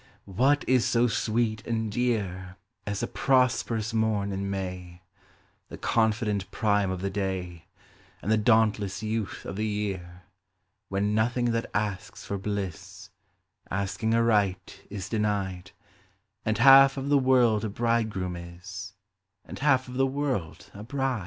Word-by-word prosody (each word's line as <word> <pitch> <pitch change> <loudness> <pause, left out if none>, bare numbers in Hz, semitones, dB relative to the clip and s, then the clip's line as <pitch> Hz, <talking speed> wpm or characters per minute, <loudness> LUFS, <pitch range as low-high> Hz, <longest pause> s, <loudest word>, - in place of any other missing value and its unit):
What 130 +9 +2
is 130 -2 +4
so 120 0 +2
sweet 110 -1 0
and 110 -2 -1
dear 100 -6 -2 0.3
As 100 0 -2
a - - 0
prosperous 120 -4 +1
morn 110 -3 0
in 100 0 -3
May, 90 -2 -5 0.7
The - - -8
confident 105 -3 0
prime 105 -3 +1
of 95 -1 -3
the 100 0 -2
day, 95 -4 -4 0.5
And 105 - -2
the - - +5
dauntless 105 -2 +2
youth 110 -1 -3
of 95 - -6
the 110 +1 -1
year, 95 -4 -4 0.7
When 100 +2 0
nothing 120 +2 +1
that 115 0 -2
asks 105 -2 -3
for 100 - -3
bliss, 100 -4 -5 0.6
Asking 100 +4 -1
aright, 105 -5 +1
is 100 -2 -5
denied, 100 -4 -2 0.8
And 110 0 +1
half 135 +2 +8
of 135 +1 -3
the 145 -1 +5
world 125 -5 +3
a 110 - -1
bridegroom 110 -5 -1
is, 95 +4 -9 0.5
And - - -9
half 135 -3 +3
of 125 0 -7
the 135 0 +3
world 130 - -3
a 100 - -9
bride 135 +1 -1
105 Hz, 140 wpm, -27 LUFS, 95-115 Hz, 0.8 s, half